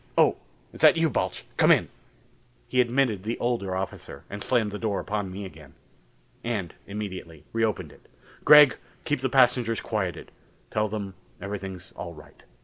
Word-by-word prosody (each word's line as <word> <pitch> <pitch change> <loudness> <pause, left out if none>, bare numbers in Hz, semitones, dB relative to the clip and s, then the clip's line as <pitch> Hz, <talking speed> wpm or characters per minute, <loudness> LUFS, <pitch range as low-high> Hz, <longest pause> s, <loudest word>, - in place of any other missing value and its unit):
Oh, - - +5 0.4
is - - -10
that - - +7
you, 165 -2 +2
Balch? - - -2
Come - - +5
in." - - +4 0.8
He 125 - +3
admitted 120 -4 +1
the 110 +4 -3
older 115 -6 -1
officer 95 +1 -6
and 100 0 -6
slammed 115 -5 +1
the 105 - -5
door 105 -3 -1
upon 105 -3 -3
me 100 +2 -6
again. 75 -5 -13 0.7
And 105 -7 -3
immediately 95 -6 -6
reopened 110 -8 -1
it. - - -20 0.4
"Gregg, 150 -3 +8 0.3
keep 150 - 0
the 130 0 -1
passengers 125 -3 +3
quieted. 95 -6 -3 0.4
Tell 105 0 0
them 100 -2 -4 0.3
everything's 95 -2 -6
all 85 -1 -8
right. 75 - -16
105 Hz, 155 wpm, -26 LUFS, 95-120 Hz, 0.8 s, Gregg